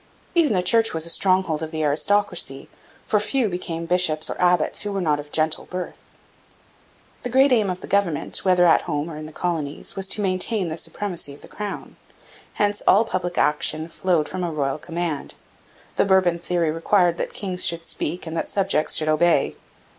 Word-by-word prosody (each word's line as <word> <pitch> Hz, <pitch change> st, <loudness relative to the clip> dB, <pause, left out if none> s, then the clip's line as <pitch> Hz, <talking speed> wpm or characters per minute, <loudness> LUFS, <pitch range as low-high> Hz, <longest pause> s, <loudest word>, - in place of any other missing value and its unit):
Even 325 Hz, -9 st, +3 dB
the 180 Hz, -2 st, +1 dB
Church 225 Hz, +1 st, +3 dB
was 160 Hz, 0 st, +1 dB
a 170 Hz, -, +2 dB
stronghold 185 Hz, -4 st, +1 dB
of 160 Hz, -, -4 dB
the 155 Hz, 0 st, -3 dB
aristocracy, 160 Hz, -2 st, 0 dB, 0.4 s
for 210 Hz, -, +2 dB
few 240 Hz, +3 st, 0 dB
became 170 Hz, -2 st, -4 dB
bishops 165 Hz, -3 st, +1 dB
or -, -, -5 dB
abbots 180 Hz, -2 st, +2 dB
who 205 Hz, -, -3 dB
were 200 Hz, -, -2 dB
not 150 Hz, -5 st, +1 dB
of 145 Hz, 0 st, -9 dB
gentle 155 Hz, 0 st, +1 dB
birth. 180 Hz, -1 st, -7 dB, 1.1 s
The 245 Hz, -, -4 dB
great 265 Hz, +3 st, +4 dB
aim 215 Hz, -5 st, +3 dB
of 185 Hz, 0 st, -5 dB
government, 200 Hz, -7 st, 0 dB
whether 180 Hz, -2 st, +4 dB
at 165 Hz, -, +5 dB
home 150 Hz, +1 st, -2 dB
or -, -, -7 dB
in 155 Hz, 0 st, -7 dB
the -, -, -11 dB
colonies, 155 Hz, -4 st, -3 dB
was 195 Hz, 0 st, 0 dB
to 210 Hz, -, +1 dB
maintain 185 Hz, 0 st, 0 dB
the 160 Hz, -, -4 dB
supremacy 175 Hz, -8 st, -5 dB
of -, -, -19 dB
the -, -, -13 dB
crown. 210 Hz, -1 st, -7 dB, 0.6 s
Hence 205 Hz, 0 st, 0 dB
all 215 Hz, +4 st, +6 dB
public 180 Hz, -4 st, -3 dB
action 155 Hz, +2 st, +1 dB
flowed 170 Hz, -3 st, 0 dB
from 185 Hz, -1 st, -4 dB
a 175 Hz, -, -1 dB
royal 145 Hz, -1 st, -2 dB
command. 165 Hz, -1 st, -4 dB, 0.6 s
The -, -, +4 dB
Bourbon 185 Hz, -3 st, +3 dB
theory 170 Hz, -2 st, 0 dB
required 175 Hz, +1 st, +2 dB
that -, -, -2 dB
kings 185 Hz, -3 st, -1 dB
should 170 Hz, 0 st, 0 dB
speak 170 Hz, +3 st, -3 dB
and 160 Hz, 0 st, -6 dB
that -, -, -2 dB
subjects 190 Hz, -6 st, +1 dB
should 155 Hz, -, 0 dB
obey. 155 Hz, -1 st, +2 dB
175 Hz, 190 wpm, -23 LUFS, 160-195 Hz, 1.1 s, all